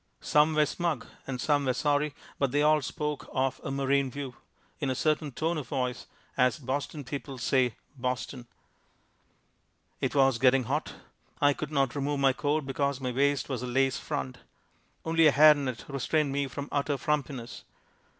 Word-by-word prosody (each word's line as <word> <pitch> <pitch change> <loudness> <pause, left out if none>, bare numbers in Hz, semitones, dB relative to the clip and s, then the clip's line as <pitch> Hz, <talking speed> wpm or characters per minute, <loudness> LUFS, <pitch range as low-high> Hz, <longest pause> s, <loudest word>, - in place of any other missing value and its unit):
Some 150 +1 +3
were 150 0 +5
smug 165 -4 -2 0.2
and 130 -2 -4
some 145 +1 +2
were 130 -1 +1
sorry 145 -1 +1 0.2
but 140 - +2
they 145 +2 +2
all 155 0 +4
spoke 150 +1 -4
of 130 0 -1
a - - -4
"marine 135 0 +1
view" 135 0 -6 0.5
in 140 -4 -1
a 130 - 0
certain 155 +1 0
tone 160 +5 -1
of 135 - -7
voice, 125 +1 -2 0.3
as 125 -1 +3
Boston 145 +2 -3
people 135 0 -6
say 125 -1 +1 0.2
"Boston." 125 -1 -4 1.5
It - - -1
was 135 -3 +4
getting 130 +1 +4
hot. - - -2 0.4
I 145 0 +4
could 155 +1 -6
not 135 -4 +1
remove 145 0 -1
my 135 -1 +4
coat 145 +2 0
because 140 0 -1
my 130 -2 -2
waist 140 +2 +1
was 130 -4 -3
a 125 - -4
lace 135 +1 +1
front. 65 -1 -4 0.7
Only 165 0 +4
a - - +6
hair 150 +2 +8
net 130 -7 -4
restrained 145 +1 0
me 140 0 0
from 140 +2 -6
utter 145 0 0
frumpiness. 135 -5 -3
140 Hz, 170 wpm, -29 LUFS, 130-150 Hz, 1.5 s, hair